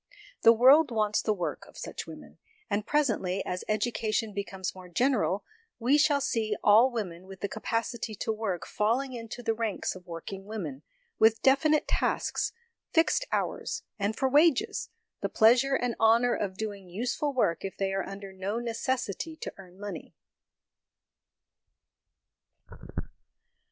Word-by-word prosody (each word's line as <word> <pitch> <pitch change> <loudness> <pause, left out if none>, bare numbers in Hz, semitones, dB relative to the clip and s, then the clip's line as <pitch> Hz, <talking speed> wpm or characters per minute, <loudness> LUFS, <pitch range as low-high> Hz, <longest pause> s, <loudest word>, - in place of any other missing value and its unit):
The 230 - +8
world 265 +6 +6
wants 215 -3 +1
the 215 - 0
work 180 -5 -3
of - - -16
such - - -6
women; - - -11 0.3
and 205 +1 0
presently, 220 -10 +1
as 180 0 -3
education 215 0 0
becomes 195 -2 -4
more 185 -1 -12
general, 225 -1 +1 0.3
we 250 +4 +3
shall 295 -1 +4
see 225 -6 0
all 220 +5 +7
women 185 -6 -5
with 190 0 -11
the 200 - 0
capacity 230 +1 -3
to 220 - -2
work 200 -9 -3
falling 250 +5 0
into 235 0 -7
the 225 - +1
ranks 225 -2 -2
of 185 -1 -13
work 165 +3 -7
ing 195 0 -8
women, 175 -11 -5 0.4
with 220 0 +4
definite 300 +3 +4
tasks, - - 0 0.4
fixed 340 +9 +3
hours, - - -2 0.2
and 205 +2 0
for 265 - +2
wages, 295 +1 +3 0.3
the - - -1
pleasure 245 +5 +5
and 245 -2 0
honour 230 +2 +5
of 190 -2 -3
doing 200 -4 -5
useful 240 +9 -1
work 240 -11 +1
if 195 - -5
they 195 -1 -1
are 195 - 0
under 195 0 -8
no 195 +3 -3
necessity 240 - -2
to - - -6
earn 185 -1 -14
money. 205 -5 -7
220 Hz, 145 wpm, -29 LUFS, 195-245 Hz, 0.4 s, The